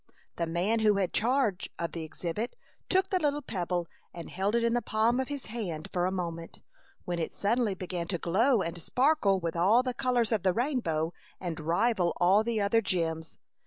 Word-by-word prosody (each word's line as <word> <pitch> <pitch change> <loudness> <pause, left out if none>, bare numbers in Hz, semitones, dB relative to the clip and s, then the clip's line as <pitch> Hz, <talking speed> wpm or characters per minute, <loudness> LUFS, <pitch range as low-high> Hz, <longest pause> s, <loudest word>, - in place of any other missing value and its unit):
The 170 - -1
man 180 +7 +1
who 215 -2 +4
had 195 -2 0
charge 235 -5 +1
of 170 - -3
the 165 - -5
exhibit 175 +8 -4 0.3
took 380 0 +2
the 370 - +2
little 295 -2 0
pebble 175 -5 -2 0.3
and 170 -2 -8
held 195 +4 0
it 235 - +2
in 235 0 +2
the 240 - +1
palm 225 +3 +1
of 265 - -1
his 285 -2 -5
hand 195 -9 -5
for 180 0 +1
a - - -1
moment, 170 -3 -5 0.4
when 175 -1 -2
it 160 - -3
suddenly 215 -1 +1
began 180 -2 -4
to 175 - -1
glow 220 +7 +2
and 170 +1 -5
sparkle 250 - +2
with 170 -1 -3
all 200 +9 +4
the 255 -1 -2
colors 245 -2 +1
of 220 -4 +2
the 185 0 +2
rainbow 175 - 0 0.3
and 170 -4 -4
rival 175 +3 +1
all 190 +4 +5
the 230 -1 -1
other 205 +3 +3
gems. 165 -5 -2
195 Hz, 200 wpm, -29 LUFS, 170-235 Hz, 0.4 s, all